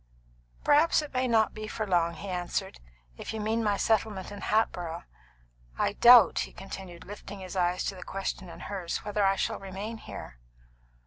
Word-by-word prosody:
"Perhaps 305 +2 +4
it 295 - -9
may 255 0 +1
not 225 -2 +3
be 215 0 -6
for 215 0 -3
long," 170 -3 +1
he 200 - -8
answered, 175 - -3 0.4
"if - - -6
you - - -3
mean 220 +2 0
my 205 -2 +1
settlement 210 -3 0
in 205 - -8
Hatboro'. 175 -6 0 0.7
I - - +1
doubt," 240 0 +8
he - - -3
continued, 190 -3 -9
lifting 205 0 -9
his 185 0 -8
eyes 180 0 +1
to - - -2
the 180 - -10
question 195 -1 -4
in - - -10
hers, 190 -4 -4
"whether 210 0 0
I 195 0 +4
shall - - -1
remain 195 +4 -6
here." - - -9
200 Hz, 180 wpm, -29 LUFS, 180-220 Hz, 0.7 s, doubt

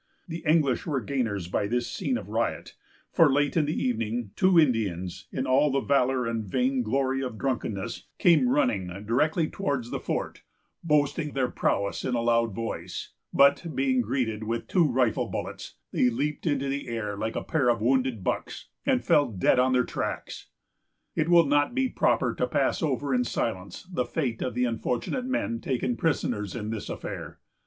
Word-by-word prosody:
The 165 -1 -6
English 155 -2 +2
were 145 -4 0
gainers 110 -7 -2
by 100 +3 -1
this 120 +2 0
scene 255 - -2
of - - -8
riot; - - -2 0.4
for 165 -5 +5
late 145 +1 +1
in 160 -3 +3
the 150 - -1
evening, 115 -2 -1
two 185 -2 +5
Indians, 100 - 0
in - - -2
all 135 +3 +3
the 135 - +2
valor 130 -2 +2
and 115 -1 -2
vain 130 +5 0
glory 135 +3 0
of 125 -4 -4
drunkenness, 110 -7 -3
came 175 +8 +4
running 255 - +1 0.2
directly 155 +8 +2
towards 140 -11 -3
the - - -2
fort, - - -3 0.4
boasting 150 -1 +1
their 130 -2 0
prowess 100 0 0
in 125 - -1
a 120 - 0
loud 115 -3 +2
voice; 115 0 -5 0.2
but 140 +4 +4
being 130 -1 +2
greeted 115 -2 -1
with 115 +1 -3
two 175 -4 +3
rifle 125 -3 +1
bullets, - - -6 0.2
they 125 - +3
leaped 145 +7 -2
into 140 -2 0
the 140 0 -3
air 115 -3 -3
like 110 +2 -3
a - - -2
pair 140 -6 +1
of 120 -1 +2
wounded 125 -2 +1
bucks, - - -3 0.2
and - - +2
fell 145 -2 +4
dead 100 +5 +3
on 130 +1 +3
their 125 0 +3
tracks. - - -4 0.7
It 160 +1 0
will 170 -1 +7
not 145 - +2
be 265 0 +2
proper - - +1
to - - -1
pass - - +1
over 140 -3 0
in 125 -1 +3
silence 100 -5 -3
the 175 -9 -2
fate 120 -3 -2
of 125 - -2
the 125 0 +2
unfortunate 125 - -2
men 185 - -1
taken 125 -1 -1
prisoners 115 - -1
in 110 -2 -4
this 110 -2 -5
affair. - - -6
130 Hz, 180 wpm, -27 LUFS, 115-145 Hz, 0.7 s, will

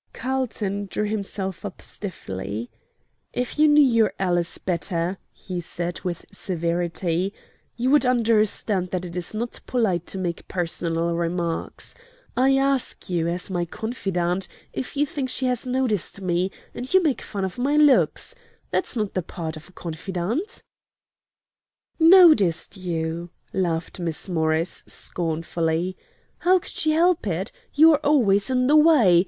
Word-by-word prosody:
Carlton 220 -6 -2
drew 210 +2 -2
himself 195 -3 -3
up 200 -3 -6
stiffly. 110 - -6 0.6
"If 250 +4 -3
you 305 - +7
knew 295 0 +7
your 230 -5 +3
ALICE 175 -3 0
better," 175 0 -2
he 180 -2 -6
said, 175 +1 -4
with 175 -3 -4
severity, 175 +1 -1 0.4
"you 250 +2 +1
would 295 -1 +5
understand 215 -6 +2
that 185 0 -3
it 170 -1 -8
is 180 +4 -3
not 235 +2 -3
polite 195 -9 0
to - - -6
make 175 -3 -3
personal 170 -1 -1
remarks. 170 0 -2 0.4
I 270 +2 +4
ask 270 -7 +2
you, 170 -2 +1
as 175 +3 -3
my 175 -1 0
confidante, 185 -3 -2 0.3
if 260 - -5
you 290 - +3
think 275 -2 -4
she 260 +1 -1
has 250 0 0
noticed 250 -8 -1
me, 180 0 0 0.2
and 250 +2 -5
you 375 -1 +5
make 295 -6 +1
fun 200 -2 -3
of 190 +5 -6
my 285 +4 +2
looks! 295 - +4 0.4
That's - - -1
not 210 -4 -1
the 185 - 0
part 160 -1 -6
of 155 +2 -11
a - - -17
confidante." 185 - -4 1.4
"Noticed 320 - +6
you!" 170 -2 -3 0.2
laughed 170 -2 -1
Miss 170 0 -3
Morris, 160 -1 0
scornfully. 165 +1 -2 0.4
"How 370 +1 +4
could 360 - -7
she 310 - +1
help 330 -3 +3
it? 185 +3 -2 0.2
You 320 +3 +8
are 290 - +2
always 250 -9 +3
in 255 -1 +2
the 290 +4 +4
way. 295 - +6
190 Hz, 145 wpm, -24 LUFS, 170-255 Hz, 1.4 s, You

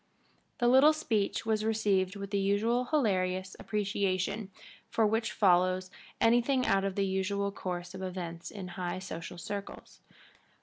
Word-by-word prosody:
The 240 - +2
little 265 +5 +7
speech 225 -12 -1
was 215 -1 +1
received 205 -3 +1
with 200 -1 -6
the 200 - +1
usual 215 +5 +1
hilarious 185 -9 0
appreciation 200 -1 -1 0.5
which 220 0 +2
follows 185 -1 +3 0.3
anything 245 +3 +3
out 195 0 +2
of 195 -1 -2
the 200 - +1
usual 195 +1 -1
course 180 -2 -5
of 190 - -7
events 175 -3 -5
in 195 -3 -7
high 180 -1 -4
social 175 -2 -7
circles. 200 +4 -7
200 Hz, 135 wpm, -30 LUFS, 185-220 Hz, 0.5 s, little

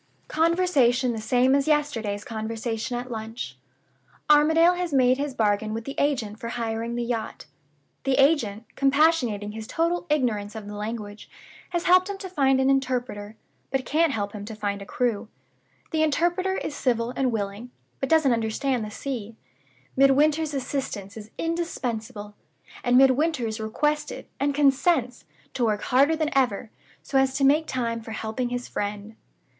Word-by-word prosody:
"Conversation 305 -7 +2
the 225 -2 -4
same 250 +4 +3
as 280 +1 +2
yesterday's 230 -10 0
conversation 225 +2 -3
at 245 +1 -6
lunch. 225 +1 -6 0.8
Armadale 320 +4 +6
has 355 -2 -3
made 255 -1 +3
his 285 -2 -3
bargain 215 0 +1
with 225 - -4
the 275 - -5
agent 235 -7 0
for 230 - -5
hiring 230 0 -3
the 240 - -1
yacht. 230 -2 -4 0.6
The 270 -1 +1
agent 260 -7 +2
(compassionating 275 -7 +2
his 220 0 -7
total 340 +2 -1
ignorance 225 -8 0
of 220 -2 -7
the 205 - -7
language) 210 0 -6 0.4
has 345 -1 -2
helped 365 +2 +5
him 400 - -4
to 380 -1 -7
find 270 -6 +2
an 265 - +2
interpreter, 250 -6 -1 0.3
but 265 -1 -1
can't 320 +1 +2
help 205 -5 -2
him 205 -1 -7
to 220 +1 -7
find 205 -1 -3
a 200 - -9
crew. 235 -3 -1 0.6
The 315 - +1
interpreter 345 +5 +1
is - - -4
civil 235 -3 0
and 260 -2 +1
willing, 205 +2 -4 0.3
but 270 - -2
doesn't 315 -5 +4
understand 230 +2 -1
the 215 - -5
sea. 230 -2 -5 0.6
Midwinter's 290 +3 +3
assistance 245 -7 -4
is 215 -1 -9
indispensable; 245 -11 -3 0.5
and 245 0 +4
Midwinter 270 +1 +3
is 220 0 -3
requested 295 +8 -2
(and 280 0 0
consents!) 275 -2 +2 0.3
to 250 - -1
work 210 -2 0
harder 280 +5 +3
than 310 -2 -2
ever, 235 -5 +1 0.3
so 275 -1 +1
as 265 0 +1
to 275 - 0
make 300 +4 +4
time 230 -3 -2
for 225 0 -8
helping 220 +3 -3
his 245 0 -4
friend. 205 +1 -4
250 Hz, 160 wpm, -25 LUFS, 220-290 Hz, 0.8 s, Armadale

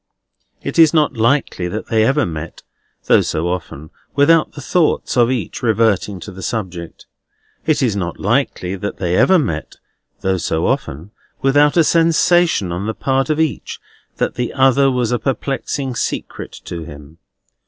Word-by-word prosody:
It - - -2
is 160 0 +6
not 150 -3 +3
likely 115 -5 +1
that 105 +5 -5
they 110 -1 +3
ever 135 +3 +2
met, 80 0 -7 0.4
though - - +5
so 80 +2 -2
often, 80 -4 -5 0.2
without 155 +3 +4
the - - -9
thoughts 170 +3 0
of 120 -2 +4
each 125 -5 -3
reverting 110 -4 +1
to 100 - -8
the 95 0 -10
subject. 90 -5 -5 0.6
It 155 -3 +2
is 115 -5 +1
not 90 -4 -4
likely 90 +1 0
that 100 +2 -5
they 90 -2 -1
ever 185 - +5
met, 80 - -3 0.5
though 95 0 0
so 80 -1 -1
often, 80 +9 -2 0.3
without 145 +3 +4
a 165 - +6
sensation 165 - +3
on 90 +4 -3
the 110 - -3
part 135 +2 0
of 155 0 0
each 160 -3 -2 0.4
that - - -1
the 125 -1 -3
other 135 0 +4
was 125 -3 0
a 120 - +1
perplexing 135 +1 -2
secret 120 - -4
to 85 - -6
him. 75 0 -12
115 Hz, 165 wpm, -18 LUFS, 90-140 Hz, 0.6 s, is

